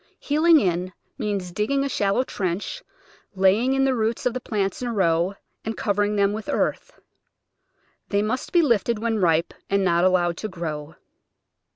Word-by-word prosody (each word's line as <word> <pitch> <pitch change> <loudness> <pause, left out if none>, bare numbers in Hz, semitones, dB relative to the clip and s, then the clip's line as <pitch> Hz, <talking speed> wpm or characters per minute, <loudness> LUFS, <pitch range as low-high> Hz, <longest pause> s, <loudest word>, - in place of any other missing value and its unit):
Heeling 315 +2 +4
in 180 -3 -1 0.3
means 195 -4 -2
digging 220 +9 0
a - - 0
shallow 210 -2 +1
trench, 195 - -3 0.5
laying 200 +7 +3
in 270 0 +2
the 265 - +2
roots 225 -1 -1
of 250 - +1
the 255 - -3
plants 200 -4 -2
in 250 - -2
a 235 - -2
row, 175 0 +1 0.3
and 220 0 -4
covering 205 -4 0
them 200 0 +2
with 215 0 -6
earth. - - -2 1.1
They 200 0 +1
must 240 +4 -2
be 345 -1 +4
lifted 235 -4 +2
when 225 0 -1
ripe 165 -2 +2 0.2
and 200 0 +2
not 170 -1 +2
allowed 175 -2 +2
to 215 - -4
grow. 160 -5 -6
205 Hz, 170 wpm, -24 LUFS, 185-235 Hz, 1.1 s, Heeling